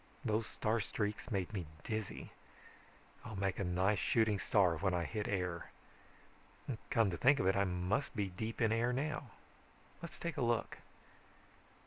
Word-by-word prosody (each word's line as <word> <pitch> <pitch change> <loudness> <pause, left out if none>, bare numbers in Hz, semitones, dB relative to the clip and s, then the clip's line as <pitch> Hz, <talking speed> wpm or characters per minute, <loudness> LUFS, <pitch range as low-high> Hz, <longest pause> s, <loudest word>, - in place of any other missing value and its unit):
Those 110 +1 +1
star 110 +1 0
streaks 105 +2 -2
made 100 -2 -1
me 90 -6 -3 0.2
dizzy. 110 -2 -4 0.9
I'll 110 - -7
make 95 -1 0
a - - +1
nice 95 +3 +2
shooting 110 -3 +3
star 95 -6 +4
when 95 -2 +1
I 85 - +1
hit 105 +4 -3
air. 90 -3 -2 1.2
Come 115 -5 +3
to 85 - -3
think 135 - +5
of - - +1
it, 95 - +4
I 100 0 +3
must 90 +10 -1
be 105 -3 0
deep 110 +6 -4
in 110 -1 +4
air 115 +2 +2
now. 140 0 -2 0.7
Let's 170 - -7
take 170 -2 -4
a - - 0
look. 120 -1 0
105 Hz, 160 wpm, -36 LUFS, 95-115 Hz, 1.2 s, think